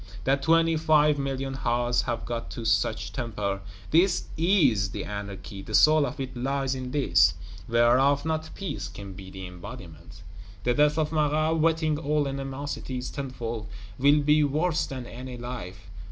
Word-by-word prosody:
That 135 +3 +2
twenty 165 +1 +3
five 150 -2 +4
million 135 -1 -2
hearts 120 -1 +1
have 120 -2 -3
got 120 -1 -4
to 115 - -5
such - - 0
temper, 105 -4 -3 0.3
this 175 +5 +3
is 155 - +3
the - - -5
Anarchy; 100 -1 -6
the 95 - -3
soul 155 -2 +6
of 135 +4 -7
it 130 -1 -5
lies 135 +2 -1
in 130 -1 -5
this, 95 - +3 0.3
whereof 125 +5 +3
not 160 0 -2
peace 195 -2 -4
can 100 -1 -9
be 95 0 -10
the 95 0 -8
embodiment! 90 - -11 0.4
The 120 - +2
death 150 +3 +3
of 155 -1 0
Marat, 155 +1 +1
whetting 160 -1 +2
old 150 -1 0
animosities 135 -2 -4
tenfold, 120 -6 -5 0.3
will 145 +3 +5
be 150 +1 +4
worse 155 +4 +1
than 130 -2 -6
any 125 +1 -8
life. 100 -6 -7
135 Hz, 155 wpm, -27 LUFS, 115-150 Hz, 0.4 s, soul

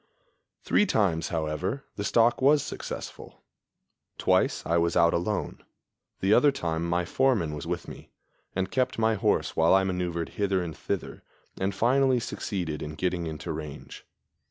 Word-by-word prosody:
Three 210 - +3
times, 85 - +1
however, 85 - -2
the 100 - -4
stalk 115 +4 +3
was 145 +2 +5
successful. - - -7 0.7
Twice - - +1
I 85 +1 +2
was 85 +1 +1
out 85 -1 +5
alone; 90 +4 -2 0.6
the 95 +2 +3
other 140 +6 +6
time 80 -10 -2
my 85 +1 +1
foreman 110 - +1
was 75 +1 -6
with 85 0 -3
me, - - -11 0.5
and 95 0 -1
kept 130 -1 0
my 110 0 +3
horse 100 -7 0
while 80 +3 +5
I 95 - +4
maneuvered 90 -3 -2
hither 100 -3 0
and 80 -3 -6
thither, - - -4 0.4
and 95 +1 -1
finally 130 +1 +3
succeeded 90 -9 -4
in 75 0 -5
getting 90 +1 -1
into 80 0 -5
range. 75 -2 -8
90 Hz, 155 wpm, -27 LUFS, 80-110 Hz, 0.7 s, other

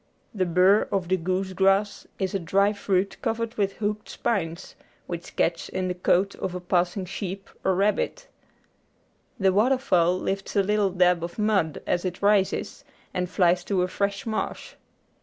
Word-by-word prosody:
The 185 -4 0
burr 185 +4 +4
of 185 -3 -1
the 185 - +4
goose 185 +2 -2
grass 195 +2 +1
is 190 -2 -2
a 195 - 0
dry 195 +4 +2
fruit 195 -1 -1
covered 230 0 -2
with 195 -3 0
hooked 210 0 -3
spines, 170 -5 -2 0.3
which 170 -1 -7
catch 165 0 0
in 185 -1 -2
the - - 0
coat 180 +2 +1
of 185 -1 -4
a - - -3
passing 180 +1 0
sheep 195 +1 -6 0.2
or 190 - +2
rabbit. 210 - 0 1.1
The 190 -1 +3
water 245 +7 +3
fowl 180 -8 +2
lifts 195 +2 -3
a 200 - +4
little 205 0 +2
dab 180 -2 +2
of 170 0 -6
mud 210 -7 0
as 175 - 0
it 180 -2 -3
rises 200 -2 +1 0.3
and 180 -1 -2
flies 180 -1 +2
to 190 -3 +1
a - - 0
fresh 200 +1 -2
marsh. 220 -1 -3
190 Hz, 170 wpm, -25 LUFS, 180-205 Hz, 1.1 s, burr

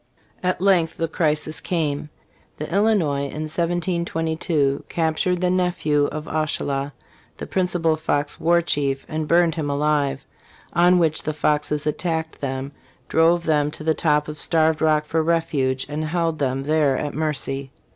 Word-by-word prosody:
* - - -35
At - - -7
length 180 -4 +2
the 165 - 0
crisis 155 -1 0
came. 150 -4 -2 0.5
The 150 - -4
Illinois 185 -9 +2
in 150 +2 -5
1722 165 -3 -1
captured 170 +2 0
the 180 0 +2
nephew 175 -5 +1
of 155 +1 -5
Oushala, 145 -2 -1 0.5
the - - -6
principal 175 -4 +1
Fox 150 -2 -1
war 170 +1 +3
chief, 140 -4 0
and 155 0 -3
burned 170 0 +4
him 150 -3 -3
alive; 140 -1 0 0.5
on 175 +1 +5
which 160 -3 +2
the 155 - -3
Foxes 150 0 0
attacked 160 +1 -2
them, 135 0 -3 0.4
drove 170 +1 +3
them 150 -2 +2
to 150 - -8
the 160 0 +2
top 150 -2 +1
of 150 0 -7
Starved 160 -1 +2
Rock 155 -1 +3
for 160 +1 0
refuge, 155 -5 0
and 150 +2 -3
held 165 0 -1
them 135 -1 -1
there 150 -2 +2
at 145 - -3
mercy. 140 -3 -2
155 Hz, 155 wpm, -22 LUFS, 145-170 Hz, 0.5 s, on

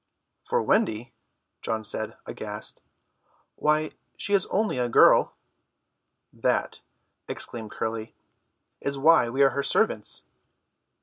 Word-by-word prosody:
"For 475 0 0
Wendy?" 120 - 0 0.5
John 110 -1 -2
said, 110 0 -3
aghast. - - -6 0.7
"Why, 155 +1 +1 0.3
she 205 - 0
is 195 -2 +3
only 210 -9 0
a 120 -1 0
girl!" - - +5 1.0
"That," - - -1 0.5
explained 110 -3 -1
Curly, 110 +1 -5 0.6
"is 140 0 -3
why 135 -4 +5
we 135 +4 +2
are 135 - +5
her 140 - -1
servants." - - +1
135 Hz, 110 wpm, -26 LUFS, 115-155 Hz, 1.0 s, girl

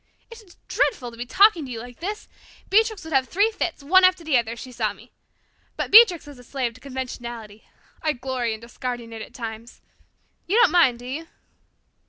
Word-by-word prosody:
It 460 0 -11
is 370 -5 -20
dreadful 250 - -1
to 230 - -14
be 240 +1 -6
talking 375 - +5
to 260 - -8
you 230 - -5
like 245 +1 -11
this. 415 +5 -5 0.4
Beatrix 440 -2 +2
would 320 -1 -7
have 265 -1 +2
three 410 +5 +2
fits, 345 -8 -4
one 375 +6 +5
after 370 -1 +4
the 310 -4 0
other, 235 -2 +1
if 235 - -11
she 255 - -9
saw 245 - -2
me. - - -19 0.7
But - - -3
Beatrix 400 -8 +7
is 285 -3 -12
a - - -14
slave 250 -2 -3
to 255 - -18
conventionality. 240 -5 -7 0.4
I 310 -1 0
glory 250 -3 -3
in 220 - -14
discarding 240 0 -6
it 225 - -7
at - - -11
times. 230 -1 -8 0.7
You 400 +6 +2
don't 465 -9 +5
mind, 320 -9 +4
do 245 - -12
you?" 295 +6 -6
265 Hz, 210 wpm, -23 LUFS, 240-360 Hz, 0.7 s, Beatrix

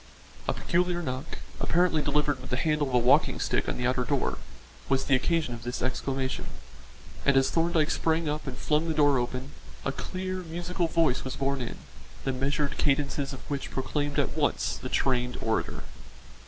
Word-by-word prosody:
A - - +2
peculiar 175 0 0
knock, 130 +1 -4 0.2
apparently 175 -2 +3
delivered 145 -2 +1
with 130 - -9
the 125 - 0
handle 150 0 +1
of 130 - -5
a - - +7
walking 125 +1 +4
stick - - 0
on - - -2
the 125 - -1
outer 125 0 +2
door, 140 +1 0 0.5
was 135 0 +2
the 135 - +2
occasion 155 -1 +1
of 120 - -7
this 120 +1 -3
exclamation, 130 +1 -2 0.8
and 140 -1 +4
as 135 0 +4
Thorndyke 165 -2 +2
sprang 160 0 +1
up 150 0 -2
and 130 -1 -4
flung 155 +2 +1
the 160 - -1
door 145 -3 +5
open, 125 +3 -3 0.3
a - - +1
clear, 185 0 -4
musical 175 0 -2
voice 165 -6 +2
was 130 - -4
borne 135 0 0
in, 120 - -4 0.5
the 135 - 0
measured 140 +2 -1
cadences 140 -1 +1
of 135 - -9
which 140 -1 -3
proclaimed 145 +2 -2
at - - +1
once - - +1
the - - -6
trained 125 -2 +1
orator. 110 0 -1
140 Hz, 180 wpm, -28 LUFS, 130-160 Hz, 0.8 s, a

